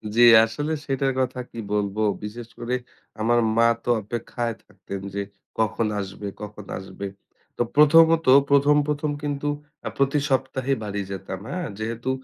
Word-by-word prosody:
জ্বি, 120 - +6 0.2
আসলে 145 +8 -4
সেটার 135 0 0
কথা 130 0 -1
কি 115 - -8
বলবো, 105 +1 0 0.2
বিশেষ 115 +2 -6
করে 120 +1 -1 0.5
আমার 120 +2 +3 0.2
মা 115 0 +6 0.2
তো - - -4
অপেক্ষায় 120 +1 -4
থাকতেন 100 -1 -8
যে, 100 - -2 0.4
কখন 110 0 +1
আসবে, 100 +1 -6
কখন 105 -1 -8
আসবে? 95 +1 -7 0.5
তো - - 0
প্রথমত 165 +2 +6 0.2
১ম, 140 +1 +5
১ম 150 0 -1
কিন্তু 145 0 -2 0.4
আ - - -1
প্রতি 140 +2 +2
সপ্তাহে 130 0 0
বাড়ি 100 -1 -3
যেতাম, 95 -1 -5
হ্যাঁ। 180 +1 -3
যেহেতু 115 +3 -3
120 Hz, 145 wpm, -24 LUFS, 105-140 Hz, 0.5 s, জ্বি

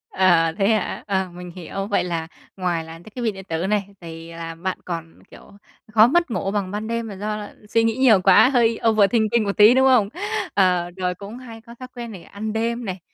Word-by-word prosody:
À, 170 -3 +4
thế 195 -1 +2
hả? 215 -4 -1
À, 190 -2 -1
mình 180 0 -9
hiểu, 195 +3 -5
vậy 205 - +1
là 165 -2 -3 0.3
ngoài 175 -3 -1
là 160 - -10
cái 170 +6 -13
thiết 250 - -4
bị 225 -2 +1
điện 190 -1 -10
tử 165 +3 -2
này 200 -1 0
thì 165 0 -9
là 165 0 -7
bạn 185 +2 -3
còn, 165 -2 -6
kiểu, - - -15 0.4
khó 220 +1 +7
mất 340 -1 +1
ngủ 195 -2 -2
bằng 200 -2 -2
ban 210 +1 -4
đêm 230 0 -3
là 200 - -7
do 210 +2 -3
là 205 -1 -9
suy 230 0 +2
nghĩ 225 0 +1
nhiều 230 -8 +5
quá, 250 - +6
hơi 230 -4 +2
overthinking 220 +1 +3
một 200 -1 -3
tí, 215 +3 +8
đúng 265 +1 +4
không? 230 -6 +4 0.4
Ờ, 180 -3 +2
rồi 180 -1 -1
cũng 205 +5 -9
hay 230 -3 -11
có 235 +1 -14
thói 255 - -8
quen 235 -2 -6
này, 185 -4 -10
ăn 215 +1 -6
đêm 235 +1 -2
này, 185 -1 -4
200 Hz, 235 wpm, -22 LUFS, 180-225 Hz, 0.4 s, tí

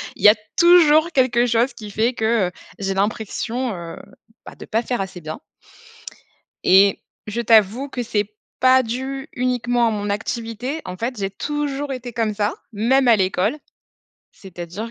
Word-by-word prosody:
il - - -14
y 210 - +10
a 215 - +6 0.2
toujours 340 -2 +6
quelque 250 -4 +2
chose 235 +2 +1
qui 210 -2 -10
fait 230 +5 +1
que, 220 -3 +1
heu, 180 - -6 0.3
j'ai 195 -1 -1
l'impression 220 +3 -2
heu, 170 -1 -8 0.5
bah, - - -11
de - - -11
pas 225 +1 0
faire 245 -3 -2
assez 185 -2 -6
bien 155 +1 -7 1.3
et 195 +1 +5 0.2
je 230 +3 -2
t'avoue 225 +4 +3
que 245 -2 -4
c'est 210 -2 -2 0.3
pas 260 0 +5
dû 265 +3 -4
uniquement 245 -1 0
à - - +1
mon 205 -1 -3
activité. 230 +7 -4
En 180 - -6
fait, 240 +5 -3
j'ai 195 -1 -2
toujours 290 +4 -3
été 245 -2 -7
comme 225 -2 -1
ça, 205 +1 -1 0.2
même 250 +5 +2
à 230 - +7
l'école. 190 +6 0 0.8
C'est-à-dire 190 +3 -8
230 Hz, 165 wpm, -21 LUFS, 205-255 Hz, 1.3 s, y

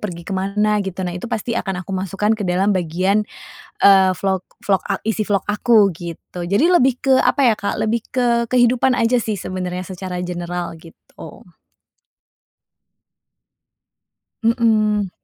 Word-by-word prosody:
pergi 170 -5 -6
ke 195 - -6
mana 210 +2 0
gitu. 190 -1 -4
Nah 175 - -3
itu 180 +6 -6
pasti 235 0 -3
akan 195 -5 -3
aku 195 - -7
masukkan 195 +3 -1
ke 220 - -3
dalam 190 +3 +2
bagian, 185 +3 +1 0.6
eee, 190 -1 +6
vlog 190 +1 -2 0.2
vlog, 190 -5 +1
a 195 - -3
isi 215 -1 0
vlog 200 -1 +1
aku, 210 0 +4
gitu. 175 +1 -8
Jadi 205 - +2
lebih 265 -8 +3
ke 265 -1 +3
apa 285 - +2
ya 220 - +2
Kak, 200 - -3
lebih 225 +1 -1
ke 235 -2 +1
kehidupan 250 +1 +3
aja 245 0 +2
sih 215 -5 -2
sebenarnya 185 -1 -5
secara 185 -1 -5
general 175 -1 -4
gitu. 165 0 -14 2.9
Hmm. 215 -4 +2
200 Hz, 145 wpm, -19 LUFS, 185-225 Hz, 2.9 s, eee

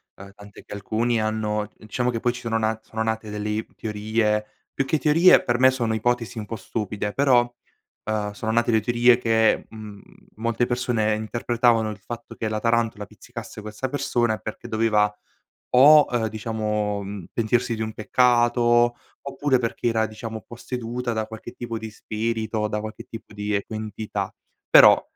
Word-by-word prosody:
ehm, 100 0 -12
tant'è 100 0 -14
che - - -10
alcuni 115 +3 0
hanno 105 -1 -1
diciamo 120 +3 -2
che 115 - -2
poi 120 +1 0
ci 125 - -8
sono 115 -1 -1
na 110 0 0
sono 110 0 -4
nate 110 -1 -2
delle 105 +1 -3
teorie, 105 0 -1 0.3
più 135 - -1
che 155 - +1
teorie 165 +4 +5
per 120 0 0
me 130 - +7
sono 120 -4 -1
ipotesi 120 +1 -1
un 105 - -4
po' 115 - -5
stupide, 105 0 -4
però, 125 -3 +3 0.5
ehm, 105 -1 -1
sono 110 +2 -3
nate 120 +1 +2
le 110 -1 +3
teorie 120 +2 +4
che, 115 -2 +2
mhmm, 105 -2 -10 0.3
molte 115 +2 0
persone 120 -3 0
interpretavano 115 0 +1
il 105 - -7
fatto 120 0 -8
che 110 - -3
la 110 0 -2
tarantola 115 -3 0
pizzicasse 105 - -10
questa 105 +5 -5
persone 120 -5 0
perché 110 - -7
doveva 105 -2 +2 0.6
o, 145 +4 +8
ehm, 115 -2 +1
diciamo, 105 -2 -2
mhmm, 100 -3 -7
pentirsi 115 +1 0
di 110 - -3
un 110 0 -3
peccato 120 0 +3 0.3
oppure 140 -1 0
perché 120 0 -3
era, 110 -1 +1
diciamo, 110 0 -7
posseduta 120 0 -4
da 110 -1 -2
qualche 110 +1 -9
tipo 120 -2 -5
di 110 0 -7
spirito, 110 0 -2
da 105 0 -2
qualche 110 +2 -7
tipo 115 -2 -11
di, 105 0 -3
ecco, 100 +2 -3
entità. 110 0 -4 0.3
Però, - - +8
110 Hz, 170 wpm, -24 LUFS, 105-120 Hz, 0.6 s, o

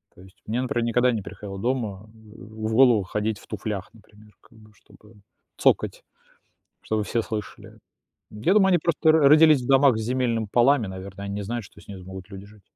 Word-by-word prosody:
То 90 - -16
есть 95 0 -18
мне, 115 +4 -2
например, 120 -2 -1
никогда 125 +2 +2
не 110 -3 -3
приходило 100 0 -9
дома 110 -4 -3
в 110 0 -8
голову 120 -5 +5
ходить 105 +2 -3
в - - -18
туфлях, 105 -2 -5
например, 105 0 -20
как 115 - -23
бы 110 0 -19
чтобы 105 +2 -21 0.4
цокать, - - +1 0.8
чтобы 110 -1 -2
все 115 +2 -1
слышали. 105 -4 -8 0.5
Я 110 - 0
думаю, 200 -2 +4
они 180 - +4
просто 160 0 +1
р 155 - +6
родились 155 -2 +6
в 120 - -7
домах 135 -3 +4
с 110 - -3
земельными 115 -2 -1
полами, 125 -2 +3
наверное, 95 +1 -8
они 100 0 -5
не 105 - -4
знают, 120 +2 -4
что - - -18
с - - -21
ними 100 -2 -9
смогут 95 +1 -10
люди 100 0 -10
жить. 105 -1 -19
110 Hz, 200 wpm, -24 LUFS, 100-125 Hz, 0.8 s, р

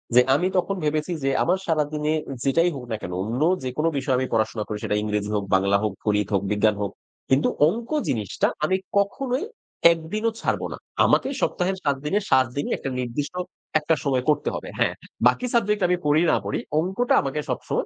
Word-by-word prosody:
যে 125 - +9
আমি 180 +5 +1
তখন 195 +2 0
ভেবেছি 155 +3 0
যে, 135 - +2
"আমার 180 +3 +2
সারাদিনে 150 -1 0 0.3
যেটাই 165 +6 +3
হোক 130 - -6
না - - 0
কেন 90 - -5
অন্য 120 +6 -3 0.2
যেকোন 130 +5 -2
বিষয় 135 -1 +1
আমি 130 0 0
পড়াশোনা 110 -1 0
করি 105 - -3
সেটা 105 - 0
ইংরেজি 105 -1 -2
হোক, 100 - 0
বাংলা 100 +1 +3
হোক, 105 -3 0
গণিত 105 -1 +1
হোক, 100 - +3
বিজ্ঞান 105 0 +3
হোক, 100 - -2 0.4
কিন্তু 135 +3 +3 0.2
অঙ্ক 230 +7 -2 0.2
জিনিসটা 105 -6 0 0.2
আমি 185 +5 +2 0.2
কখনোই 255 - 0 0.5
১ 170 - +1 0.2
দিনও 225 +1 +1
ছাড়ব - - 0
না। - - -7 0.3
আমাকে - - +3
সপ্তাহের 190 +1 0
৭ 140 -1 +2
দিনে 200 +7 +2
৭ 130 0 +6
দিনই 145 - -1
একটা 135 - -4
নির্দিষ্ট 125 +6 -3 0.5
একটা 160 +1 +1
সময় 130 -3 +1
করতে 145 -1 +2
হবে, - - -6
হ্যাঁ। - - +2 0.3
বাকি 250 - +1
সাবজেক্ট 210 -3 +2
আমি 180 0 +2
করি 150 +2 +4
না - - +4
পড়ি - - -1 0.2
অঙ্কটা 190 +9 0
আমাকে 140 +2 -3
সবসময় - - -2
145 Hz, 190 wpm, -24 LUFS, 115-180 Hz, 0.5 s, যে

